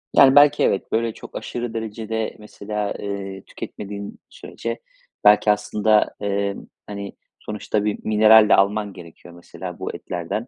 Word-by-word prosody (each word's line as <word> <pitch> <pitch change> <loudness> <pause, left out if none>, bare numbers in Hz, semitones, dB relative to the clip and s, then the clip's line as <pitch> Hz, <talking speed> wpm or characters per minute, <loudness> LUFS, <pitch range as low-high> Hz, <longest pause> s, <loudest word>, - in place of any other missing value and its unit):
Yani, 135 -1 +7
belki, 145 0 +6
evet, 95 - 0
böyle, 115 0 0
çok - - -12
aşırı 120 -1 -5
derecede, 110 0 -4
mesela, 105 -1 -4
eee, 100 -1 -6
tüketmediğin 100 0 -8
sürece - - -6 0.4
belki 105 0 +6
aslında, 105 +1 +1
emm, 100 -1 -2 0.2
hani, 100 -1 -6 0.3
sonuçta 105 0 -3
bir 105 - -1
mineral 110 0 +6
de - - +7
alman 100 +1 +1
gerekiyor, 85 0 -13
mesela, 85 - -9
bu - - -5
etlerden, 90 +7 -4
105 Hz, 140 wpm, -22 LUFS, 100-110 Hz, 0.4 s, Yani